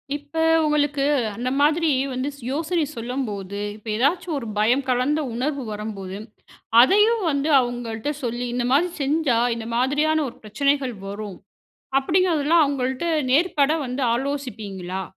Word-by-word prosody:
இப்ப 290 +1 -10 0.3
உங்களுக்கு 290 -2 +1 0.3
அந்த 250 +2 -2
மாதிரி 315 +3 +3 0.2
வந்து 255 +3 -2 0.2
யோசனை 325 +3 0
சொல்லும்போது, 215 -5 -4 0.2
இப்ப 215 +1 -16
ஏதாவது 305 +9 +1
ஒரு 230 -4 -5
பயம் 240 +6 +3
கலந்த 255 +5 +1 0.2
உணர்வு 275 +2 -2
வரும்போது, 205 -3 -6 0.6
அதையும் 420 - +5
வந்து 280 +2 0
அவங்கள்ட்ட 240 -1 -4
சொல்லி 240 0 -2
இந்த 245 - -1
மாதிரி 345 +6 +3
செஞ்சா, 280 -3 +1 0.2
இந்த 225 -1 -6
மாதிரியான 290 +5 +2
ஒரு 235 - -11
பிரச்சனைகள் 265 +4 0
வரும். 200 -1 -6 0.6
அப்டீங்குறதெல்லாம் 330 0 +3
அவங்கள்ட்ட 265 +1 -2 0.3
நேர்பட 300 -1 +3
வந்து 255 +2 -3
ஆலோசிப்பீங்களா? 220 -9 -4
270 Hz, 125 wpm, -23 LUFS, 230-295 Hz, 0.6 s, அதையும்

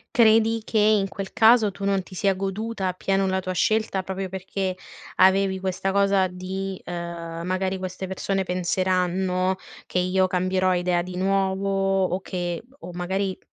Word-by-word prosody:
Credi 225 -1 +5
che 220 - 0
in 210 -1 +4
quel 195 0 -6
caso 225 -1 +5
tu 195 +1 -6
non 195 -1 +2
ti 185 0 -13
sia 195 0 +2
goduta 195 +2 -3
appieno 195 +1 0
la 190 0 +1
tua 185 0 -4
scelta, 215 +1 +1
proprio 190 0 -4
perché 190 0 -3 0.4
avevi 190 0 +4
questa 190 +1 -2
cosa 195 -1 +3
di 185 +1 -5
uhm: 170 -1 -5
"Magari 185 +1 -1
queste 185 0 -5
persone 190 +1 -1
penseranno 185 +1 0 0.3
che 180 - -1
io 185 +1 +2
cambierò 185 0 +1
idea 175 -1 +1
di 180 0 -7
nuovo." 195 0 +1
O 185 +2 -2
che 175 -1 -4 0.2
o 180 - -8
magari 190 +2 -2
190 Hz, 155 wpm, -24 LUFS, 185-195 Hz, 0.4 s, Credi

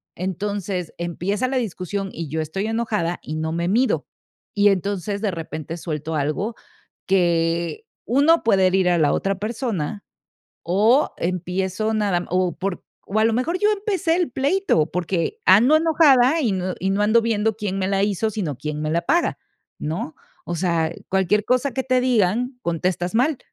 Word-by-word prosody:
entonces 190 -1 -3
empieza 180 +7 -2
la 265 0 -1
discusión, 195 -3 -3
y 165 -2 -5
yo 160 0 -2
estoy 175 +7 -3
enojada 215 -7 -1
y 155 - -5
no 160 0 -2
me 170 +1 -1
mido. 245 +6 +1 0.5
Y 205 0 +5
entonces, 200 +1 -1
de 205 -3 0
repente, 160 -1 -6
suelto 155 -1 -4
algo 155 +10 -1 0.5
que 170 - +1 0.2
uno 290 +7 +4
puede 195 -4 +4
herir 185 -1 +2
a 175 - +3
la 150 -2 +3
otra 195 0 0
persona 215 - -3 0.6
o, 215 - +3
empiezo, 185 +4 -2
nada 200 -5 0
o, 185 -1 0
por 195 -1 -4 0.2
o, 210 +3 -1
a - - +4
lo 225 - +3
mejor 330 +9 0
yo 420 +1 +3
empecé 390 -5 0
el 355 -7 0
pleito, 275 - +1
porque 180 - -2
ando 240 +11 +6
enojada 315 -3 +4
y 230 -8 +1
no 185 -1 -2
y 190 +1 0
no 200 +2 +1
ando 220 +2 +4
viendo 220 -1 0
quién 195 -3 -3
me 190 - 0
la 195 0 +1
hizo, 210 +2 0
sino 175 - -3
quién 150 +1 -4
me 155 - -1
la 170 +2 +1
paga, 335 - +1 0.4
¿no? 220 - -4 0.3
O 170 - -3
sea, 170 -2 0 0.2
cualquier 190 +2 +1
cosa 255 +1 +1
que 265 +1 -2
te 255 -1 +2
digan, 245 +1 +1
contestas 175 +3 -1
mal. 265 +4 +2
195 Hz, 170 wpm, -22 LUFS, 175-235 Hz, 0.6 s, ando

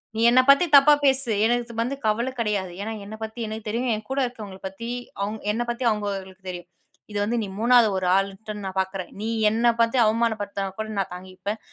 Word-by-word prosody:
நீ 225 - -1
என்ன 255 +2 +6
பத்தி 280 +6 +7
தப்பா 295 +2 +7
பேசு, 265 -3 +2
எனக்கு 240 0 0
வந்து 255 +4 -1
கவல 235 +4 +1
கடையாது. 205 -5 -1
ஏனா 220 +2 -4
என்ன 215 - -8
பத்தி 220 +2 -7
எனக்கு 220 0 -6
தெரியும். 235 +3 -1
என் 215 0 -8
கூட 275 - 0
இருக்கிறவங்கள 210 -6 -8
பத்தி 230 +5 -7 0.3
அவங் 210 +2 -2
என்ன 225 +3 -2
பத்தி 240 +2 -3
அவங்களுக்கு 195 -3 -4
தெரியும். 175 -1 -7 0.4
இது 205 - -2
வந்து 235 +3 0
நீ - - -4
3வது 240 -1 +5
ஒரு 185 -1 -1
ஆள்ன்ட்டு 195 +2 -2
நான் 190 0 -5
பார்க்குறேன். 190 -1 -5
நீ 220 - -2 0.2
என்ன 230 +2 +1
பத்தி 230 +3 +2
அவமான 230 +1 +2
படுத்தனா 200 -1 -3
கூட 220 - -2
நான் 190 - -2
தாங்கிப்பேன். 185 +4 -6
220 Hz, 200 wpm, -24 LUFS, 195-235 Hz, 0.4 s, பத்தி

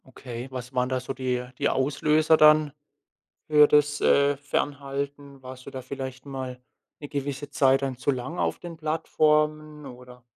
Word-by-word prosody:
Okay. 125 -1 -8
Was 125 0 -7
waren 125 0 0
da 130 -1 0
so 130 +1 -6
die 125 -2 -2
die - - +2
Auslöser 150 +4 +2
dann 155 -1 +5 0.7
für 150 -1 +6
das, 145 0 +2
äh, 140 0 +4
Fernhalten? 140 -1 -4
Warst 130 0 -10
du - - -7
da 130 - -6
vielleicht 130 0 -7
mal 130 -2 -6 0.4
'ne 145 - -8
gewisse 140 0 -4
Zeit 135 -2 +3
dann 135 -2 -3
zu 130 - -3
lang 130 +6 -5
auf - - 0
den 175 -1 -9
Plattformen, 155 -1 0
oder? 125 -1 -13
140 Hz, 160 wpm, -26 LUFS, 130-150 Hz, 0.7 s, für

